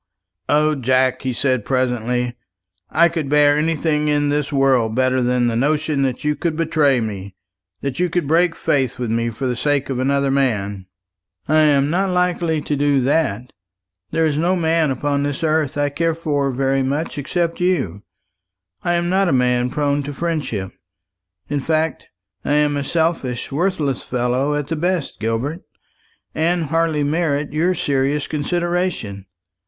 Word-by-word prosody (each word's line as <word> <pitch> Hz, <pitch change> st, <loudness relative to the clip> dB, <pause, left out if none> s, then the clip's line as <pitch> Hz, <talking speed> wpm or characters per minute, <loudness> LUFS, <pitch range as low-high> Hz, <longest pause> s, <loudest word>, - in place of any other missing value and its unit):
"O 155 Hz, +1 st, +3 dB
Jack," 130 Hz, -1 st, +1 dB
he 130 Hz, -, -2 dB
said 130 Hz, -2 st, 0 dB
presently, 125 Hz, -1 st, -1 dB, 0.5 s
"I 170 Hz, +2 st, +4 dB
could 165 Hz, -4 st, -3 dB
bear 145 Hz, 0 st, +5 dB
anything 150 Hz, -1 st, 0 dB
in 145 Hz, -1 st, +2 dB
this 145 Hz, 0 st, -1 dB
world 130 Hz, -5 st, +2 dB
better 130 Hz, 0 st, +2 dB
than 125 Hz, 0 st, +1 dB
the 115 Hz, -1 st, 0 dB
notion 150 Hz, +3 st, +1 dB
that 130 Hz, +1 st, -1 dB
you 150 Hz, 0 st, +1 dB
could 165 Hz, 0 st, -2 dB
betray 155 Hz, -5 st, +2 dB
me 100 Hz, -4 st, -5 dB, 0.5 s
that 140 Hz, 0 st, -3 dB
you 180 Hz, 0 st, +1 dB
could 170 Hz, -3 st, -1 dB
break 165 Hz, +2 st, +3 dB
faith 135 Hz, -3 st, 0 dB
with 120 Hz, -3 st, -3 dB
me 115 Hz, +1 st, 0 dB
for 115 Hz, +4 st, -5 dB
the 125 Hz, -1 st, 0 dB
sake 145 Hz, +1 st, 0 dB
of 125 Hz, -, -2 dB
another 140 Hz, +1 st, +1 dB
man." 105 Hz, -8 st, -1 dB, 0.6 s
"I 155 Hz, -, +3 dB
am 145 Hz, -2 st, +3 dB
not 190 Hz, +3 st, +1 dB
likely 175 Hz, -3 st, 0 dB
to 145 Hz, -, -2 dB
do 145 Hz, -1 st, +2 dB
that. 125 Hz, -4 st, 0 dB, 0.6 s
There 165 Hz, -, +1 dB
is 150 Hz, -1 st, 0 dB
no 175 Hz, +3 st, +2 dB
man 165 Hz, -3 st, +2 dB
upon 140 Hz, +2 st, -1 dB
this 145 Hz, +2 st, -2 dB
earth 155 Hz, -3 st, +1 dB
I 145 Hz, 0 st, +1 dB
care 165 Hz, +3 st, 0 dB
for 145 Hz, -4 st, -1 dB
very 135 Hz, +1 st, 0 dB
much 145 Hz, +3 st, -2 dB
except 170 Hz, +4 st, -1 dB
you. 135 Hz, -, 0 dB, 0.8 s
I 175 Hz, -1 st, 0 dB
am 175 Hz, 0 st, 0 dB
not 190 Hz, +1 st, +2 dB
a -, -, +1 dB
man 125 Hz, -1 st, +2 dB
prone 145 Hz, +1 st, 0 dB
to 145 Hz, +1 st, -6 dB
friendship. 140 Hz, -, -3 dB, 0.8 s
In 145 Hz, 0 st, -1 dB
fact, 160 Hz, +3 st, -1 dB, 0.4 s
I -, -, 0 dB
am 150 Hz, 0 st, +2 dB
a 140 Hz, -, -1 dB
selfish 160 Hz, -6 st, -1 dB
worthless 150 Hz, -4 st, 0 dB
fellow 125 Hz, +4 st, 0 dB
at 145 Hz, -1 st, -2 dB
the 165 Hz, -, -1 dB
best, 175 Hz, -1 st, -2 dB
Gilbert, 115 Hz, +10 st, -2 dB, 0.7 s
and 170 Hz, +2 st, +1 dB
hardly 165 Hz, -2 st, +1 dB
merit 145 Hz, -1 st, 0 dB
your 175 Hz, +4 st, +1 dB
serious 140 Hz, -1 st, 0 dB
consideration. 165 Hz, -, -2 dB
145 Hz, 165 wpm, -20 LUFS, 130-160 Hz, 0.8 s, bear